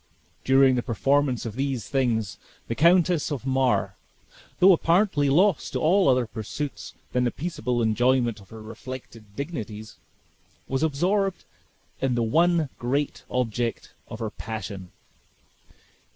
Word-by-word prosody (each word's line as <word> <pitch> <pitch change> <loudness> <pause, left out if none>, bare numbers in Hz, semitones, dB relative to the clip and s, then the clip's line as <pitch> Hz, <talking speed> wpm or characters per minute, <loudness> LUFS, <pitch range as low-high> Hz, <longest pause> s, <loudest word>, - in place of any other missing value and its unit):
During 135 0 +5
the 125 - 0
performance 135 +2 0
of 110 -2 -5
these 135 -5 -2
things, 115 -7 -1 0.3
the - - -2
Countess 170 +2 +3
of 135 -4 -4
Mar, 130 -7 +1 0.7
though 190 +1 +7
apparently 170 -4 +2
lost 180 +4 +2
to - - -1
all 175 +1 +3
other 125 -1 +3
pursuits 115 +6 -6 0.2
than 125 - +1
the 125 - +2
peaceable 125 -6 -2
enjoyment 120 0 +2
of 95 - -17
her 110 -1 -10
reflected 115 -2 -10
dignities, 110 -7 -6 0.7
was 135 0 -1
absorbed 180 +5 0 0.6
in 130 -2 +1
the 120 - +1
one 165 +5 +2
great 135 +4 -2
object 120 -1 -2
of - - -7
her 110 -2 -4
passion. 100 -4 -7
130 Hz, 130 wpm, -25 LUFS, 115-150 Hz, 0.7 s, though